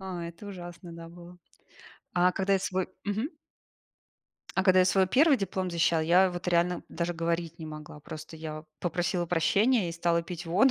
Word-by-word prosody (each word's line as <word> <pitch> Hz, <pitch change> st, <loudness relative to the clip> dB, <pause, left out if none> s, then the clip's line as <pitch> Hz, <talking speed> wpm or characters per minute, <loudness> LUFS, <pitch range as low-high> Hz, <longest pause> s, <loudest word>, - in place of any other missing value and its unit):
А, 185 Hz, -3 st, -5 dB
это 170 Hz, +4 st, -9 dB
ужасно, 175 Hz, -2 st, -8 dB
да, 165 Hz, 0 st, -9 dB
было. 175 Hz, +1 st, -13 dB, 0.8 s
А 180 Hz, +1 st, +5 dB
когда 195 Hz, +1 st, 0 dB
я 195 Hz, -, +4 dB
свой 185 Hz, -1 st, -1 dB, 0.2 s
мгм 215 Hz, +7 st, -1 dB, 1.3 s
а 190 Hz, -, +4 dB
когда 185 Hz, -1 st, +6 dB
я 185 Hz, -, +6 dB
свой 190 Hz, 0 st, +4 dB
первый 280 Hz, -, +5 dB
диплом 190 Hz, -2 st, -2 dB
защищала, 170 Hz, -1 st, +2 dB
я 180 Hz, +4 st, +5 dB
вот 175 Hz, 0 st, -4 dB
реально 175 Hz, 0 st, +2 dB
даже 170 Hz, +1 st, -2 dB
говорить 165 Hz, 0 st, -2 dB
не 160 Hz, -, -7 dB
могла. 155 Hz, -1 st, -9 dB
Просто 155 Hz, +2 st, -9 dB
я 155 Hz, -1 st, -6 dB, 0.2 s
попросила 175 Hz, 0 st, -1 dB
прощения 185 Hz, +5 st, +3 dB
и -, -, -5 dB
стала 170 Hz, 0 st, +1 dB
пить 175 Hz, 0 st, -7 dB
воду, 200 Hz, +11 st, +4 dB
175 Hz, 180 wpm, -29 LUFS, 170-190 Hz, 1.3 s, когда